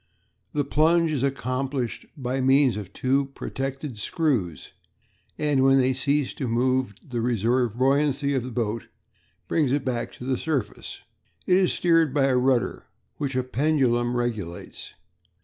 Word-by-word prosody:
The 145 - +1
plunge 160 +3 +3
is 145 -5 -1
accomplished 130 -1 -2
by 130 0 -2
means 135 0 +4
of 100 -3 -6
two 135 +5 +1
protected 135 -2 -5
screws, 105 - -1 0.7
and 150 -3 +1
when 135 0 +5
they 130 0 +3
cease 140 +1 0
to 135 - -4
move 125 -1 +1
the 120 -3 -3
reserve 120 0 +1
buoyancy 140 +2 +2
of 130 - +1
the 125 - -6
boat 115 -2 -3 0.6
brings 150 -6 +1
it 140 0 0
back 120 -3 -2
to - - -11
the 130 0 0
surface. 140 -10 -3 0.4
It 180 - +4
is 190 -2 +2
steered 165 -5 +2
by 140 - +3
a 135 -2 +2
rudder 125 -1 +1 0.3
which 140 -3 -3
a 130 - +1
pendulum 125 -3 +1
regulates. 110 -8 -5
130 Hz, 150 wpm, -25 LUFS, 120-140 Hz, 0.7 s, when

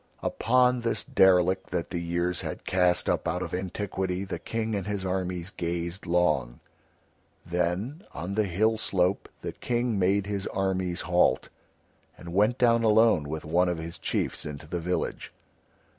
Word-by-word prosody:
Upon 125 +1 +2
this 115 0 -1
derelict 95 0 +3
that 90 -2 -3
the 85 - -2
years 85 +1 -1
had - - -6
cast 90 -1 +2
up - - 0
out - - -1
of - - -6
antiquity 95 0 -2
the 95 - -5
King 110 -1 -3
and 100 -2 -2
his 100 -2 -2
armies 90 -1 -2
gazed 85 +2 -4
long. 75 -9 +1 0.9
Then 90 - -2
on 85 +4 -5
the 105 +1 +2
hill 110 +5 +1
slope 95 -3 +1
the - - -4
King 120 -3 -1
made 95 +2 +2
his 100 -1 -3
armies 95 -2 -1
halt, 90 0 +2 0.7
and 85 -1 -9
went 105 +6 +3
down 115 -2 +4
alone 110 -9 +4
with 80 0 -4
one 90 +3 +2
of 90 - -1
his 80 +1 -7
chiefs - - -2
into 75 -1 -7
the 85 +2 -3
village. 90 +2 -3
90 Hz, 160 wpm, -27 LUFS, 85-105 Hz, 0.9 s, down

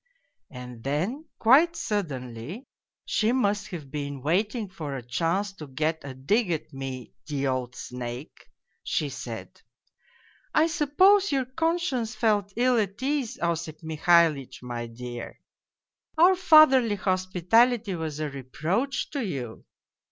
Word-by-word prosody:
" - - -53
And 125 -5 -10
then 185 - -2
quite 300 +9 +5
suddenly 150 - -4 0.4
she 220 +1 +1
must 210 -5 +1
have 155 -8 -8
been 140 -3 -5
waiting 205 - 0
for 155 -7 -6
a 130 - -6
chance 170 +10 -1
to 155 -6 -10
get 155 +4 -1
a 135 -2 -7
dig 200 - +1
at 160 -2 -3
me, 135 -2 -6
the 140 -2 -2
old 130 -2 -2
snake 125 +3 -7 0.4
she - - -1
said - - -8 0.5
' - - -32
I 310 - +5
suppose 370 +6 +4
your 270 -2 +1
conscience 270 -5 -1
felt 210 -3 +1
ill 245 0 +3
at 200 -1 -2
ease, 275 -4 -1
Osip 160 -2 -2
Mihalitch, 160 -4 +2
my 120 -1 -5
dear! 120 +1 -8 0.8
Our 350 +4 +7
fatherly 305 - +6
hospitality 190 +4 +2
was 160 -3 -4
a 155 - -1
reproach 155 - -2
to 280 -4 -2
you 130 - -5
180 Hz, 135 wpm, -26 LUFS, -, 0.8 s, Our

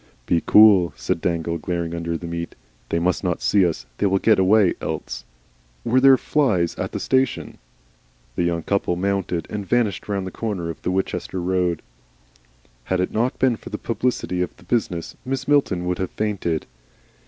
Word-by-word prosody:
"Be 85 +4 +2
cool!" 100 -7 +6
said - - -2
Dangle, 85 -1 -1
glaring 85 0 -3
under 85 0 -2
the 85 - -9
meat. 85 0 -5 0.3
"They - - 0
must 85 +1 0
not - - 0
see 100 -2 +3
us. 80 -7 -4
They - - +3
will 95 0 +2
get 110 +1 +3
away 95 0 +4
else. - - -5 0.6
Were 120 +2 +3
there 135 0 +7
flys 110 - +1
at - - -3
the - - -4
station?" 130 -1 0 0.8
The - - 0
young 85 -1 0
couple 100 -3 0
mounted 95 -2 -1
and 105 -1 -3
vanished 105 -1 0
round 100 -2 -1
the 95 - -5
corner 95 -7 -3
of - - -12
the - - -2
Winchester 95 0 -2
road. 90 -2 0 1.0
Had 95 - 0
it 90 - 0
not 120 +4 0
been 130 -3 +2
for - - -11
the 105 - -4
publicity 115 -6 -1
of 90 - -3
the - - -18
business, 90 -4 -2
Mrs. 135 +1 -2
Milton 135 -12 +2
would 90 -1 -1
have 95 - -1
fainted. 100 -7 -2
95 Hz, 180 wpm, -22 LUFS, 85-110 Hz, 1.0 s, there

